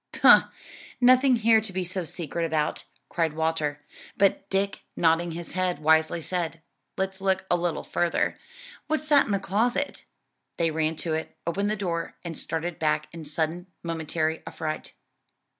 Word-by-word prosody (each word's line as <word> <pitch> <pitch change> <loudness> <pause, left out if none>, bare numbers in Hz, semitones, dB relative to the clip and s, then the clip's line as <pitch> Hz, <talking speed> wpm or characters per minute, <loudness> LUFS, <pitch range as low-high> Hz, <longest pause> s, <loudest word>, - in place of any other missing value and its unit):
"Pooh! - - +7 0.5
nothing 255 +1 +6
here 225 -1 +4
to 220 -2 -3
be 185 0 -2
so 185 +1 -3
secret 170 0 -4
about," 155 -2 -1 0.2
cried 165 -3 0
Walter, 155 -2 -1 0.3
but 200 -1 +2
Dick, 195 +1 0
nodding 165 0 +2
his 170 +1 -7
head 185 -1 0
wisely 160 +2 +3
said, 165 -1 -3 0.4
"Let's 190 0 -2
look 190 -1 +1
a - - +5
little 175 -1 -1
further. 175 -1 0 0.5
What's 310 0 -2
in 285 -5 +6
that 200 -2 0
closet?" 240 +8 0 0.5
They 165 -1 +2
ran 160 0 0
to 160 +1 -2
it, 160 0 -4
opened 200 +5 0
the 215 - +1
door, 170 -5 -3
and 165 -1 -4
started 165 +2 -3
back 155 -1 0
in 165 -2 -8
sudden 160 +4 -2 0.2
momentary 160 -1 -1
affright. 155 -1 -5
170 Hz, 155 wpm, -26 LUFS, 160-195 Hz, 0.5 s, Pooh